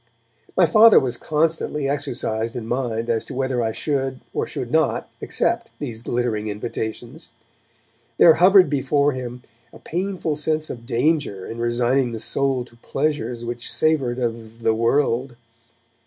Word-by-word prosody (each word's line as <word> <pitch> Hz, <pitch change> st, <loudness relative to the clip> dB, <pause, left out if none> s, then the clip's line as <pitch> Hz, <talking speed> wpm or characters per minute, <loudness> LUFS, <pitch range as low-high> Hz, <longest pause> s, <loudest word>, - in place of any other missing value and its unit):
My -, -, +6 dB
Father 225 Hz, 0 st, +7 dB
was 125 Hz, -2 st, -2 dB
constantly 150 Hz, 0 st, -1 dB
exercised 120 Hz, -5 st, -2 dB
in 120 Hz, -3 st, -5 dB
mind 115 Hz, -2 st, -2 dB
as 115 Hz, -2 st, 0 dB
to 135 Hz, -, -8 dB
whether 130 Hz, -2 st, -1 dB
I 110 Hz, -1 st, 0 dB
should 135 Hz, 0 st, -2 dB
or -, -, -1 dB
should -, -, -5 dB
not -, -, +1 dB
accept -, -, -1 dB
these 115 Hz, -6 st, -6 dB
glittering 120 Hz, -3 st, -2 dB
invitations. 115 Hz, +6 st, -5 dB, 0.9 s
There 165 Hz, -, +8 dB
hovered 185 Hz, +2 st, +6 dB
before 140 Hz, +1 st, +1 dB
him 125 Hz, -1 st, -6 dB, 0.3 s
a -, -, -13 dB
painful 180 Hz, -2 st, -3 dB
sense 155 Hz, 0 st, 0 dB
of 120 Hz, -1 st, -9 dB
danger 125 Hz, -, 0 dB
in 115 Hz, -, -7 dB
resigning 120 Hz, +2 st, +1 dB
the 115 Hz, -, -4 dB
soul 135 Hz, +1 st, 0 dB
to 120 Hz, -1 st, -20 dB
pleasures 120 Hz, -3 st, -2 dB
which 120 Hz, 0 st, -3 dB
savoured 140 Hz, -6 st, +1 dB
of 115 Hz, -2 st, -4 dB
'the 110 Hz, -, +3 dB
world'. 120 Hz, +2 st, +1 dB
125 Hz, 145 wpm, -22 LUFS, 115-145 Hz, 0.9 s, There